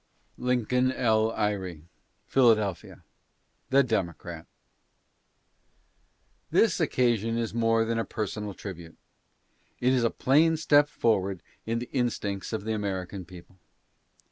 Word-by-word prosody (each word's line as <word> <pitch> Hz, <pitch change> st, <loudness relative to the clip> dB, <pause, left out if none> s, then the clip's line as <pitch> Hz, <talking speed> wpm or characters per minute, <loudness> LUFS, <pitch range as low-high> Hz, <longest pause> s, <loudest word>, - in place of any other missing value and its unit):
LINCOLN 125 Hz, +1 st, +1 dB
L. 110 Hz, -3 st, +2 dB
EYRE: 95 Hz, -7 st, -2 dB, 0.4 s
Philadelphia. 110 Hz, -7 st, +2 dB, 0.7 s
THE 140 Hz, +1 st, +5 dB
DEMOCRAT. 85 Hz, -, -3 dB, 2.0 s
This -, -, +3 dB
occasion 115 Hz, -2 st, +1 dB
is 115 Hz, -2 st, -2 dB
more 115 Hz, -1 st, +2 dB
than 115 Hz, 0 st, -1 dB
a -, -, +1 dB
personal 105 Hz, -2 st, -4 dB
tribute. 85 Hz, -6 st, -9 dB, 0.8 s
It 125 Hz, +1 st, +2 dB
is 125 Hz, -2 st, +2 dB
a 115 Hz, -, +3 dB
plain 160 Hz, +7 st, +3 dB
step 145 Hz, -1 st, +4 dB
forward 100 Hz, -, 0 dB, 0.2 s
in 115 Hz, +1 st, 0 dB
the 120 Hz, +1 st, -5 dB
instincts 110 Hz, -6 st, -2 dB
of 110 Hz, -3 st, -3 dB
the 110 Hz, +1 st, -2 dB
American 95 Hz, -3 st, -4 dB
people. 90 Hz, +1 st, -14 dB
110 Hz, 115 wpm, -27 LUFS, 95-120 Hz, 2.0 s, THE